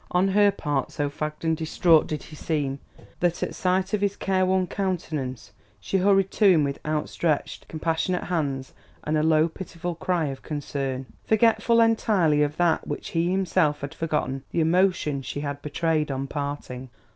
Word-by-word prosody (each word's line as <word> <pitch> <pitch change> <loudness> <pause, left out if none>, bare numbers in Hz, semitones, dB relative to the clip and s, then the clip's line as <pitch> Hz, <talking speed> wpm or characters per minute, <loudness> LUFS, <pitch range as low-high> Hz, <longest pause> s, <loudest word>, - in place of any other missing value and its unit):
On 180 +2 +2
her 205 +1 +5
part, 145 -8 -2
so 145 -1 -2
fagged 150 +2 -5
and 160 0 +2
distraught 160 0 +3
did 155 - -4
he 155 - -12
seem, 145 -3 -2 0.4
that 175 -1 0
at - - -3
sight 185 +1 0
of 210 - +1
his 200 -1 +1
care 185 -1 +1
worn 185 0 +2
countenance 160 - -3 0.3
she 195 - -1
hurried 195 0 +3
to 215 - +1
him 170 -6 +5
with 140 -1 -2
outstretched, 155 0 -1
compassionate 165 +3 -1
hands 140 -7 -2 0.3
and 155 - -1
a 155 - +2
low 160 0 +4
pitiful 175 0 -6
cry 170 0 -1
of 135 - -7
concern, 135 -3 -3 0.2
forgetful 225 +1 +3
entirely 205 -9 +3
of 150 0 0
that 175 -2 +2
which 145 - -4
he 170 +1 0
himself 180 -5 +1
had 140 0 -5
forgotten 145 -5 -2
the - - -1
emotion 165 -4 +2
she 145 +2 -5
had 145 -1 -4
betrayed 155 +1 0
on 135 0 -2
parting. 140 -3 -5
160 Hz, 170 wpm, -25 LUFS, 145-185 Hz, 0.4 s, her